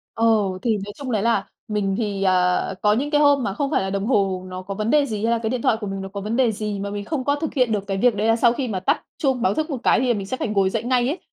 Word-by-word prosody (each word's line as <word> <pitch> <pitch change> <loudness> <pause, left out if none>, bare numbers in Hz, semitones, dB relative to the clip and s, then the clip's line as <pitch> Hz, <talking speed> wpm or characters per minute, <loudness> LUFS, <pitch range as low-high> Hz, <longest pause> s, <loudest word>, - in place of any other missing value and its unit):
Ồ, 215 -5 +2
thì 225 -3 +1
nói 205 - -8
chung 270 -3 -6
đấy 210 -2 +1
là 230 -4 +1 0.2
mình 200 -2 -1
thì, 205 -3 -2
à, 180 0 +2
có 210 0 +4
những 280 +7 0
cái 295 -1 +3
hôm 285 -2 +4
mà 195 - -2
không 275 +5 -2
phải - - +1
là 190 - -3
đồng 195 +2 -2
hồ 195 -6 +1
nó 185 0 -6
có 195 +1 -6
vấn 215 +2 -2
đề 295 0 +4
gì, 215 -2 -4
hay 230 - +2
là 235 - +2
cái 225 -1 -2
điện 250 -1 -2
thoại - - +3
của 210 - -4
mình 195 0 -4
nó 195 - -5
có 200 +1 -6
vấn 215 +4 -3
đề 250 -4 +3
gì 210 -1 -4
mà 200 - -4
mình 205 0 -4
không 270 +1 -3
có 285 0 +1
thực 315 +1 -4
hiện 250 -5 +2
được 200 -2 -2
cái 195 -1 -2
việc 245 +1 +3
đấy 210 +2 -1
là 225 - +4
sau 235 0 +4
khi 255 0 -3
mà 190 -4 -2
tắt 280 - 0 0.2
chuông 265 -5 0
báo 190 - +2
thức 310 +4 -2
một 270 - -2
cái - - +3
thì 255 - 0
là 240 - +3
mình 200 -2 -4
sẽ 260 - -3
phải - - -3
ngồi 195 -2 +2
dậy 225 +2 -2
ngay 245 0 +1
ấy. 320 - -2
220 Hz, 345 wpm, -22 LUFS, 195-255 Hz, 0.2 s, có